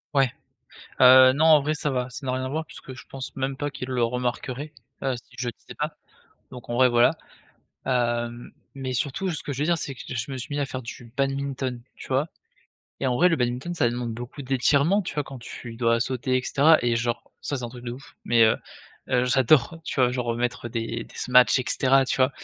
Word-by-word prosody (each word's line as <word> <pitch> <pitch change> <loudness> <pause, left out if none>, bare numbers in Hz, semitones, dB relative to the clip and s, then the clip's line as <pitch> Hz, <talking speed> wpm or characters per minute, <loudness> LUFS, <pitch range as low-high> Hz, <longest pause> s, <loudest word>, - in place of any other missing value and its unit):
Ouais, 135 -3 +4 0.7
heu, 130 0 +9
non 155 +3 +2
en 155 -3 +7
vrai 150 +2 0
ça 150 -1 -1
va, 125 -1 -2
ça - - -7
n'a - - +1
rien 130 0 -2
à 130 - -3
voir 155 +3 -2
puisque 135 -3 -10
je 125 - -12
pense 135 -1 -7
même 135 0 -2
pas 145 0 -3
qu'ils 130 -1 -6
le 125 -2 +1
remarqueraient, 125 +4 -2 0.3
heu, 135 -2 0
si 120 - -16
je 125 - -2
le 120 - -1
disais - - -13
pas, - - -3 0.5
donc 125 -2 -11
en - - -2
vrai, 130 0 +5
voilà, 120 0 +5 0.7
hem, 120 -2 -1 0.2
mais 130 -1 -4
surtout 145 +9 -1
ce 160 - -3
que 145 - -4
je 135 - -5
veux 150 - +2
dire 170 0 +2
c'est 140 - -4
que 130 - -16
je 125 +2 -4
me 135 - -4
suis 145 +4 -5
mis 145 - -1
à 140 - 0
faire 130 -1 -5
du 120 -1 -10
badminton 135 -2 -2
tu - - -11
vois, 135 +4 +1 0.7
et 130 - +1
en 125 - +1
vrai 180 +5 +5
le 165 - +2
badminton 125 +6 -2
ça 120 -8 +2
demande 120 -2 -3
beaucoup 120 +4 -8
d'étirements 140 +9 +2
tu - - -6
vois? 150 - -1
Quand 135 -1 -9
tu 115 0 -9
dois 115 0 +2
sauter 130 +1 0
et - - -4
cetera, 155 +3 +5
et 120 -1 +1
genre 120 0 -1 0.2
ça, 145 - -3
c'est 125 - -5
un - - -4
truc 120 -1 -11
de 120 - -4
ouf 135 +4 -10
mais 115 -1 +5
heu 110 - +4 0.5
heu, 125 -1 +2
j'adore. 135 +4 +3
Tu - - -5
vois 125 -1 +4
genre 120 -2 -2
mettre 120 0 -2
des 115 -1 -3
des - - -18
smashs 125 +1 +5
et 125 - -2
cetera 135 0 +3
tu 135 - -1
vois, 130 0 +3
130 Hz, 240 wpm, -25 LUFS, 120-140 Hz, 0.7 s, heu